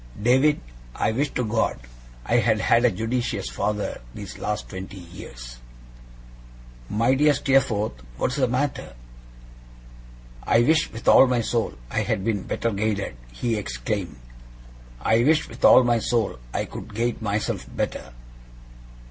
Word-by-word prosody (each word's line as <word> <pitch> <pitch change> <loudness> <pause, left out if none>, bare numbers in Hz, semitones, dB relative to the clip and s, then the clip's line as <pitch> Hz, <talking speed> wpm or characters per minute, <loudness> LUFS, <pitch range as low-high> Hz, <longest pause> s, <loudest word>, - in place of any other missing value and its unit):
David, 130 +7 +3 0.4
I - - +1
wish 140 +6 0
to 125 - 0
God 110 +1 0 0.5
I 120 - +2
had 110 -2 +2
had 115 +2 +3
a - - +6
judicious 115 - -2
father 105 +11 -2
these 100 -2 -8
last 105 0 -3
twenty 95 0 -8
years!' 60 -9 -10 1.3
'My 115 +5 +2
dear 145 +2 +4
Steerforth, 110 - +1 0.2
what - - 0
is 135 - -4
the 130 -2 +2
matter?' 130 - -2 1.5
'I 115 - +3
wish 155 +4 +2
with 115 - -9
all 135 - +8
my 125 -2 +1
soul 115 0 -1 0.2
I - - 0
had 95 - -1
been 105 -2 0
better 115 - -2
guided!' 100 - -2 0.2
he 115 - -1
exclaimed. 90 - -3 0.9
'I 110 - +3
wish 155 +3 +3
with 115 - -12
all 130 - +8
my 120 -1 +2
soul 110 - -1
I - - -2
could - - -9
guide 120 +1 -1
myself 105 -1 -2
better! - - -3
115 Hz, 145 wpm, -24 LUFS, 100-125 Hz, 1.5 s, all